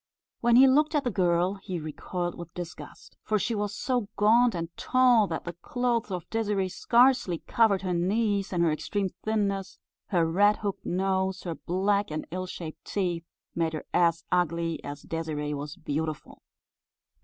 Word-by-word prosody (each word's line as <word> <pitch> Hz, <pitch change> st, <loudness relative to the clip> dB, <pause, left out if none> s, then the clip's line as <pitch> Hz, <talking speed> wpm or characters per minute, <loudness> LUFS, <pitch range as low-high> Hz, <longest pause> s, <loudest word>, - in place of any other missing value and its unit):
When 240 Hz, 0 st, +4 dB
he 260 Hz, +2 st, +9 dB
looked 300 Hz, +4 st, +3 dB
at 290 Hz, -, +2 dB
the 245 Hz, -, -1 dB
girl, 180 Hz, 0 st, +1 dB
he 185 Hz, -2 st, -4 dB
recoiled 175 Hz, +3 st, -4 dB
with 170 Hz, -1 st, -9 dB
disgust; 175 Hz, -1 st, -9 dB
for 215 Hz, -, 0 dB
she 230 Hz, +4 st, -1 dB
was 205 Hz, -1 st, -2 dB
so 250 Hz, -5 st, -1 dB
gaunt 225 Hz, +2 st, +4 dB
and 165 Hz, 0 st, -5 dB
tall 250 Hz, -4 st, +4 dB
that 160 Hz, -3 st, -4 dB
the 170 Hz, -, -5 dB
clothes 240 Hz, +5 st, -1 dB
of 180 Hz, -4 st, -4 dB
Désirée 205 Hz, -4 st, 0 dB
scarcely 240 Hz, -3 st, +3 dB
covered 210 Hz, -5 st, +3 dB
her 185 Hz, -1 st, -1 dB
knees, 200 Hz, +3 st, 0 dB
and 175 Hz, -2 st, +1 dB
her 165 Hz, -, +3 dB
extreme 195 Hz, +5 st, -2 dB
thinness, 200 Hz, -3 st, -1 dB, 0.3 s
her 175 Hz, -4 st, +2 dB
red, 205 Hz, +6 st, +3 dB
hooked 200 Hz, -1 st, -3 dB
nose, 190 Hz, +1 st, 0 dB
her 170 Hz, -, -3 dB
black 200 Hz, +5 st, 0 dB
and 155 Hz, 0 st, -4 dB
ill 185 Hz, +1 st, -3 dB
shaped 165 Hz, -3 st, -8 dB
teeth, 175 Hz, -4 st, -2 dB, 0.3 s
made 165 Hz, -1 st, 0 dB
her 155 Hz, -, -5 dB
as 165 Hz, -2 st, +3 dB
ugly 170 Hz, -2 st, 0 dB
as 145 Hz, 0 st, -7 dB
Désirée 155 Hz, -2 st, -3 dB
was 145 Hz, +1 st, -5 dB
beautiful. 155 Hz, 0 st, -4 dB
185 Hz, 165 wpm, -27 LUFS, 170-210 Hz, 0.3 s, he